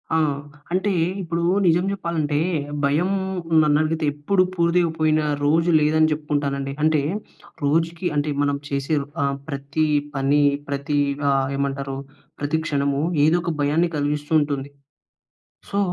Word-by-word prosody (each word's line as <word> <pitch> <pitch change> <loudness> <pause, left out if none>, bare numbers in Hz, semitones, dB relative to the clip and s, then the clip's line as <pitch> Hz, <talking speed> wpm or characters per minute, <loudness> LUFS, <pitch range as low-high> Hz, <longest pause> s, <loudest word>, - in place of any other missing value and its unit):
ఆ! - - +4 0.6
అంటే 195 +2 +1 0.3
ఇప్పుడు 170 -1 -2 0.2
నిజం 175 +2 +3
చెప్పాలంటే, 160 -6 -1 0.5
భయం 155 +7 +1 0.5
నన్నడిగితే 155 +1 +1
ఎప్పుడు 185 +6 +2
పూర్తిగా 170 0 +2
పోయిన 155 0 +2 0.2
రోజు 165 +3 +3
లేదని 155 +1 +3
చెప్పుకుంటాను 145 -2 -1
అండి. 135 0 -4
అంటే 155 -1 +3 0.6
రోజుకి 165 +4 +1
అంటే, 145 +1 0
మనం 145 0 +1
చేసే 140 +2 -1 0.3
ఆహ్, 140 0 0
ప్రతి 140 +3 -1 0.3
పని, 140 +2 +2 0.3
ప్రతి 140 +1 -1 0.3
ఆహ్, 135 -1 +2
ఏమంటారు, 140 -1 -2 0.5
ప్రతి 155 +2 0
క్షణము 140 -2 0 0.2
ఏదో 165 +3 +4
ఒక 170 - -1
భయాన్ని 155 +4 +2
కలిగిస్తూ 145 +1 -2
ఉంటుంది. 140 -2 -2 1.0
సో, 200 - -1
150 Hz, 125 wpm, -22 LUFS, 140-165 Hz, 1.0 s, ఆ